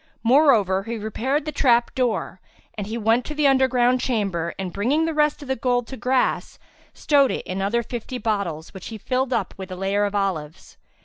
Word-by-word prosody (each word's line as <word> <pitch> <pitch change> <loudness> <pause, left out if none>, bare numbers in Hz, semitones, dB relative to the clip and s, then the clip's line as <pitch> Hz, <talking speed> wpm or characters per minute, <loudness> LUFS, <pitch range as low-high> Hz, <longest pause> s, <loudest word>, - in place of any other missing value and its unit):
Moreover, 230 -7 +4
he 225 +3 -5
repaired 255 +7 -2
the 305 - -3
trap 240 -4 +2
door 250 -4 -1 0.3
and 205 -2 -5
he 225 +2 -4
went 225 +2 +2
to 300 - -6
the 300 -1 +1
underground 255 -2 +3
chamber 195 -9 -1
and 185 -2 -5
bringing 270 +11 +1
the 325 - -1
rest 300 -1 +1
of - - -10
the 265 - 0
gold 245 0 0
to 265 - -6
grass, 255 +2 0 0.3
stowed 280 -3 +3
it - - -3
in 185 +1 -4
other 230 +5 0
fifty 240 +2 -6
bottles 200 -9 -3
which 190 - -9
he 225 - -7
filled 255 +4 -1
up - - -1
with 190 -1 -8
a - - -4
layer 195 +2 0
of 205 0 -3
olives. 170 -7 -3
235 Hz, 200 wpm, -23 LUFS, 200-265 Hz, 0.3 s, Moreover